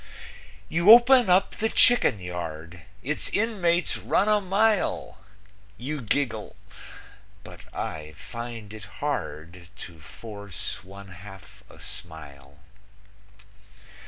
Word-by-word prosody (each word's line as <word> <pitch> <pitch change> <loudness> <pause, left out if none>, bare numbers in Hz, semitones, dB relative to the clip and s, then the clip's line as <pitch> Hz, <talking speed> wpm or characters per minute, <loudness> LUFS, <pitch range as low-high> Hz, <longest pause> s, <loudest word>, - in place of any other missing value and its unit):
You 170 - +2
open 240 -1 +8
up 180 +2 +3
the 220 - 0
chicken 240 - +5
yard; 85 -2 -7 0.2
Its 150 +4 -3
inmates 185 -6 +1
run 200 - +1
a 210 -1 +3
mile; 205 +2 0 0.6
You 140 +4 -4
giggle, 115 -2 -2 0.9
but - - -12
I 75 -1 -5
find 115 -1 -8
it 110 -1 -9
hard 85 - -4
To 85 -3 -10
force 100 +3 -7
one 100 +1 -12
half 95 +2 -13
a - - -16
smile. 70 -6 -10
110 Hz, 100 wpm, -26 LUFS, -, 0.9 s, open